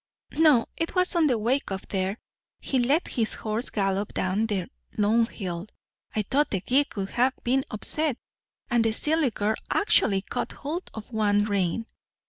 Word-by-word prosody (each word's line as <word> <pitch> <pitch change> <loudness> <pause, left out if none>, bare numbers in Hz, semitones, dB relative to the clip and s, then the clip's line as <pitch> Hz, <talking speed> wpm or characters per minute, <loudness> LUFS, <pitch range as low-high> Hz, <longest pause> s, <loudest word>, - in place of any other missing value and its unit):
No, 300 -8 +6
it 330 +3 -2
was 365 0 +2
on 330 -3 +4
the 250 -4 +2
way 245 +6 +2
up 190 -1 -5
there. 190 +1 -1 0.4
He 265 - 0
let 275 +8 +2
his 225 -3 -1
horse 220 +3 -2
gallop 195 0 -1
down 195 +4 +1
the 200 -4 -1 0.3
long 220 +2 +3
hill 180 -4 -5 0.5
I 215 - +1
thought 280 +8 +1
the 195 - -1
gig 275 +8 +2
would 195 -1 -3
have 255 +2 +2
been 260 +2 +2
upset 285 +5 -1 0.5
and 240 -3 +2
the 225 -1 +1
silly 305 +3 +2
girl 210 0 -1
actually 205 - +3
caught - - -3
hold 320 +6 -5
of 220 +2 -8
one 205 -2 +2
rein." 200 +1 0
225 Hz, 170 wpm, -26 LUFS, 205-270 Hz, 0.5 s, No